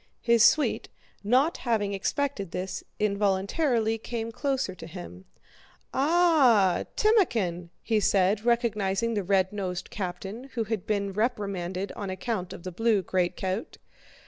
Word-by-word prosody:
His 235 Hz, -1 st, +5 dB
suite, 300 Hz, +5 st, +3 dB, 0.3 s
not 255 Hz, +10 st, +3 dB
having 215 Hz, -4 st, 0 dB
expected 200 Hz, 0 st, -2 dB
this, 180 Hz, +2 st, -4 dB
involuntarily 210 Hz, -, +1 dB
came 230 Hz, 0 st, -4 dB
closer 265 Hz, -4 st, -1 dB
to 165 Hz, -3 st, -10 dB
him. 160 Hz, -, -10 dB, 0.7 s
"Ah, 275 Hz, -, +4 dB
Timókhin!" 225 Hz, -, +2 dB, 0.3 s
said 195 Hz, +1 st, +3 dB
he, -, -, -19 dB
recognizing 230 Hz, -2 st, +1 dB
the 210 Hz, -, 0 dB
red 190 Hz, +1 st, +1 dB
nosed 185 Hz, -3 st, -4 dB
captain 195 Hz, +5 st, -5 dB
who 230 Hz, -, 0 dB
had 215 Hz, -3 st, -4 dB
been 200 Hz, -2 st, -1 dB
reprimanded 200 Hz, -4 st, -2 dB
on 200 Hz, -2 st, -6 dB
account 185 Hz, 0 st, -3 dB
of 175 Hz, -, -9 dB
the 185 Hz, -, -5 dB
blue 215 Hz, +1 st, +1 dB
greatcoat. 185 Hz, +3 st, -2 dB
205 Hz, 125 wpm, -27 LUFS, 190-235 Hz, 0.7 s, His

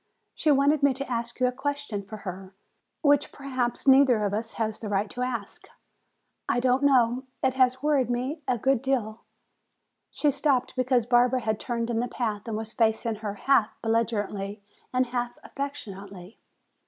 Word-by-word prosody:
She 310 Hz, -, 0 dB
wanted 285 Hz, +1 st, +4 dB
me 280 Hz, -2 st, +4 dB
to 275 Hz, +1 st, -5 dB
ask 235 Hz, 0 st, -3 dB
you 255 Hz, -, +3 dB
a 250 Hz, -, +2 dB
question 275 Hz, -4 st, -3 dB
for 210 Hz, +2 st, -9 dB
her, 190 Hz, +1 st, -7 dB, 0.5 s
which 290 Hz, 0 st, +3 dB
perhaps 255 Hz, -3 st, -3 dB
neither 265 Hz, -5 st, +6 dB
of 200 Hz, -, -1 dB
us 225 Hz, +2 st, -3 dB
has 220 Hz, -1 st, -2 dB
the 215 Hz, -, -5 dB
right 205 Hz, +1 st, 0 dB
to 250 Hz, -, -6 dB
ask. 240 Hz, -5 st, -4 dB, 0.8 s
I -, -, +2 dB
don't 255 Hz, +1 st, +2 dB
know, 255 Hz, -2 st, +3 dB, 0.2 s
it 260 Hz, -1 st, +3 dB
has 260 Hz, 0 st, +2 dB
worried 285 Hz, -5 st, +2 dB
me 255 Hz, +6 st, -2 dB
a 250 Hz, -, +1 dB
good 265 Hz, +1 st, +2 dB
deal 235 Hz, -5 st, -1 dB, 0.5 s
" -, -, -52 dB
She 295 Hz, -, +1 dB
stopped 275 Hz, -3 st, +1 dB
because 255 Hz, -2 st, +2 dB
Barbara 245 Hz, +1 st, +3 dB
had 220 Hz, -2 st, -1 dB
turned 235 Hz, -1 st, -2 dB
in 225 Hz, -, 0 dB
the 245 Hz, -, 0 dB
path 220 Hz, -4 st, -3 dB
and 220 Hz, -2 st, -2 dB
was 220 Hz, 0 st, -6 dB
facing 220 Hz, -1 st, +1 dB
her 210 Hz, -1 st, -5 dB
half 230 Hz, 0 st, +2 dB
belligerently 210 Hz, -3 st, -1 dB, 0.3 s
and 255 Hz, 0 st, +2 dB
half 245 Hz, 0 st, -3 dB
affectionately. 200 Hz, -9 st, -7 dB
245 Hz, 175 wpm, -27 LUFS, 220-265 Hz, 0.8 s, neither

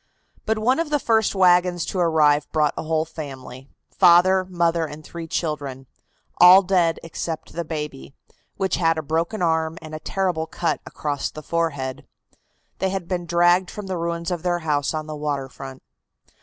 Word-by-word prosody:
But 220 Hz, 0 st, +1 dB
one 250 Hz, +7 st, +2 dB
of 330 Hz, -2 st, -1 dB
the 300 Hz, -, +2 dB
first 220 Hz, -6 st, +1 dB
wagons 180 Hz, -2 st, +3 dB
to 190 Hz, -, -3 dB
arrive 150 Hz, -4 st, +3 dB
brought 150 Hz, -2 st, +2 dB
a -, -, -3 dB
whole 160 Hz, 0 st, 0 dB
family 135 Hz, -4 st, -9 dB, 0.3 s
father, 185 Hz, +1 st, +5 dB
mother 170 Hz, -2 st, 0 dB
and 150 Hz, +1 st, -10 dB
three 165 Hz, +1 st, -8 dB
children 145 Hz, -5 st, -3 dB, 0.5 s
all 185 Hz, +2 st, +9 dB
dead 180 Hz, -3 st, +2 dB
except 165 Hz, -1 st, -6 dB
the 170 Hz, -, -3 dB
baby, 150 Hz, -, -6 dB, 0.4 s
which 190 Hz, -1 st, 0 dB
had 165 Hz, -2 st, +2 dB
a 160 Hz, -, -3 dB
broken 165 Hz, +7 st, -1 dB
arm 160 Hz, -1 st, 0 dB
and 155 Hz, -1 st, -11 dB
a 155 Hz, -, -5 dB
terrible 175 Hz, -3 st, -2 dB
cut 170 Hz, -, -2 dB
across 145 Hz, -2 st, -3 dB
the 155 Hz, -, -10 dB
forehead. 145 Hz, -5 st, -2 dB, 0.7 s
They 190 Hz, -, 0 dB
had 190 Hz, -3 st, -4 dB
been 175 Hz, -2 st, -3 dB
dragged 175 Hz, +2 st, +3 dB
from 210 Hz, -, -7 dB
the 190 Hz, -1 st, -3 dB
ruins 170 Hz, +1 st, -3 dB
of 175 Hz, -2 st, -2 dB
their 175 Hz, 0 st, -1 dB
house 145 Hz, 0 st, 0 dB
on 155 Hz, 0 st, -3 dB
the 155 Hz, 0 st, -6 dB
water 145 Hz, -2 st, -3 dB
front. 135 Hz, 0 st, -10 dB
165 Hz, 175 wpm, -22 LUFS, 150-180 Hz, 0.7 s, all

